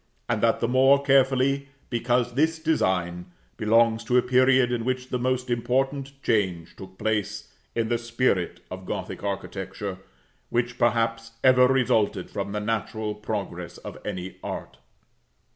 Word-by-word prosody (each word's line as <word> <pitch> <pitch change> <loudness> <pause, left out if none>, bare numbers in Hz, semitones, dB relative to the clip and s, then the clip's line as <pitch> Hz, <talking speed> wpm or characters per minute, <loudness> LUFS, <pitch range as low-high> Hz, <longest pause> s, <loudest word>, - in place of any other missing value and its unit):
and - - 0
that - - +3
the 115 - +1
more 135 +3 +5
carefully, 135 0 +3 0.2
because 120 0 +1
this 160 +5 +2
design 95 - 0 0.3
belongs 115 - +3
to 125 +2 +2
a - - +6
period 130 0 +4
in 120 -2 -1
which 130 +1 -2
the 125 - -1
most 130 0 0
important 135 +3 0
change 95 -7 0
took 95 -1 -12
place 105 -1 -2 0.2
in 115 -1 0
the 120 0 0
spirit 115 -6 0
of - - -7
Gothic - - -4
architecture, 95 0 -4 0.5
which, 120 +1 -1
perhaps, 115 -1 +1
ever 125 -1 +6
resulted 115 -7 +1
from 100 0 -3
the 105 - -2
natural 110 0 -2
progress 100 -5 -5
of - - -9
any 90 +1 -5
art. - - -6
115 Hz, 145 wpm, -25 LUFS, 105-130 Hz, 0.5 s, a